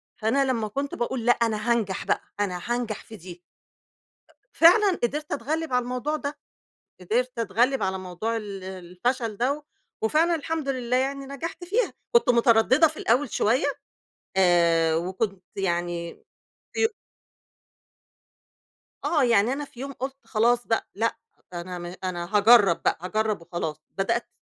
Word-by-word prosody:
فأنا 250 +6 +1
لما 235 -5 0
كنت 275 +6 -3
باقول 240 0 -2
لأ 240 - +6
أنا 230 -1 +1
هانجَح 215 -5 0
بقى، - - +1 0.2
أنا 185 -3 -1
هانجَح 240 -3 -2
في 220 - -11
دي. 180 -2 -11 1.1
فعلًاً 365 +3 +5
قدَرت 295 +6 -2
اتغّلب 300 +3 -2
على 250 - +3
الموضوع 250 +5 -2
ده، 290 -1 -5 0.6
قدَرت 240 +7 -1
اتغلّب 235 +5 +1
على 190 0 0
موضوع 185 +5 -3
ال 200 -3 -7
الفشل 190 +6 -3
ده 280 +6 -1 0.4
وفعلاً 320 +9 +3
الحمد 315 -2 -3
لله 250 -1 0
يعني 275 +1 -1
نجَحت 280 +6 -6
فيها، 460 +7 0 0.2
كنت 470 - +5
متردّدة 235 +5 +5
في 310 - -10
الأول 250 +3 +1
شوية 235 +5 +2 0.7
آآ، 170 -3 +4
وكنت 185 +3 -2
يعني 175 -2 -2 0.5
في 450 - +3 2.2
آه، 300 -5 +2
يعني 230 -1 +3
أنا 290 +2 -3
في 250 -3 -14
يوم 275 +1 -5
قُلت 265 +1 -5
خلاص 240 +2 +2
بقى 225 - 0
لأ، 225 +3 0 0.4
أنا 180 +1 -5
م 175 0 -7
أنا 175 +2 -2
هاجرّب 205 -4 +6
بقى، - - +1
هاجرّب 215 +1 -1
وخلاص، 160 -3 -4 0.2
بدأت 230 +5 0
230 Hz, 140 wpm, -25 LUFS, 190-270 Hz, 2.2 s, لأ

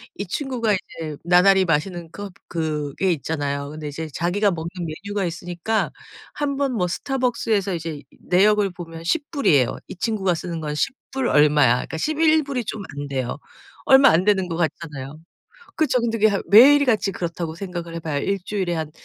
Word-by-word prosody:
이 200 - -5
친구가 235 -1 -1
이제 165 -5 -5
나날이 185 +2 +5
마시는 170 0 -1
것 205 0 -8 0.2
그게 160 +2 -1
있잖아요. 140 -2 -3
근데 155 0 -7
이제 155 +2 -5
자기가 190 +7 +1
먹는 165 -1 -4 0.4
메뉴가 205 -1 -2
있으니까 175 +5 -2 0.4
한번 280 -2 -1
뭐 180 -6 0
스타벅스에서 230 -4 -1
이제 160 -3 -5 0.2
내역을 200 +2 +3
보면 165 -2 -9
10 290 - 0
불이에요. 150 - +2
이 - - -8
친구가 195 -2 0
쓰는 170 0 -5
건 150 -1 -3
10 270 - 0 0.2
불 265 -2 0
얼마야. 150 - +5
그러니까 145 +5 -4
11 310 - +3
불이 275 -3 -3
좀 215 0 -5 0.2
안돼요. 135 -3 -3 0.5
얼마 270 +1 +7
안 170 +3 +3
되는 190 -2 +2
것 165 - -4
같잖아요. 155 -4 -4 0.6
그쵸. 260 -5 +2
근데 230 -1 -1 0.3
매일같이 245 -3 +6
그렇다고 170 -2 -4
생각을 175 -2 -6
해 170 - -4
봐요. 155 -3 -2
1 195 +6 -1
주일에 190 -4 -2
한 160 -2 -3
180 Hz, 340 characters per minute, -22 LUFS, 160-220 Hz, 0.6 s, 얼마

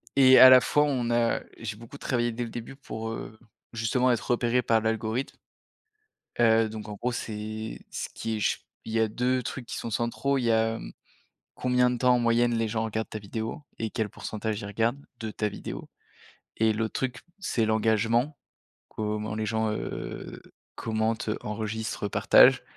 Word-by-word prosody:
et 130 -1 +8
à 130 - +12
la 130 -1 +9
fois 150 - +3
on 125 -5 0
a 120 0 +2 0.2
j'ai 110 -2 -5
beaucoup 115 +5 -11
travaillé 120 -3 0
dès 120 +2 -3
le 115 - -5
début 120 +3 -7
pour, 115 -5 -6
heu, 110 -1 -7 0.4
justement 125 +3 +2
être 120 +1 -1
repéré 120 +1 +2
par 115 -2 +2
l'algorithme. 110 +3 -2 1.0
Heu, 115 -1 +5
donc 110 0 -7
en 105 - -5
gros 125 +5 -2
c'est 110 -1 -5
ce - - -4
qui 115 - -3
est - - -4
ch - - 0 0.2
il 110 - -6
y 115 - +2
a 110 - +3
2 125 +3 0
trucs 120 +1 -5
qui - - -5
sont 115 - -4
centraux, 125 +5 0
il 125 - -2
y 115 - +2
a, 115 0 +2
mmh, - - -9 0.6
combien 125 0 +2
de 125 - -1
temps 125 0 +4
en - - +2
moyenne, 120 0 +3
les 115 -1 +1
gens 110 +1 -1
regardent 110 0 -3
ta 110 - -5
vidéo 110 +8 -5 0.2
et 115 - -1
quel 110 0 -1
pourcentage 110 0 -4
ils - - -6
regardent, 115 +6 0 0.2
de 110 -1 -4
ta 105 0 -1
vidéo - - -7 0.7
et 110 -1 +3
l'autre 110 0 -2
truc 125 -1 -2 0.2
c'est 115 - 0
l'engagement, 115 +5 +2 0.5
comment 105 0 -3
les 110 0 -2
gens, 110 0 0
heu, - - -5 0.3
commentent, 110 0 -1
enregistrent, 110 0 -3
partagent. - - +6
115 Hz, 185 wpm, -27 LUFS, 110-120 Hz, 1.0 s, à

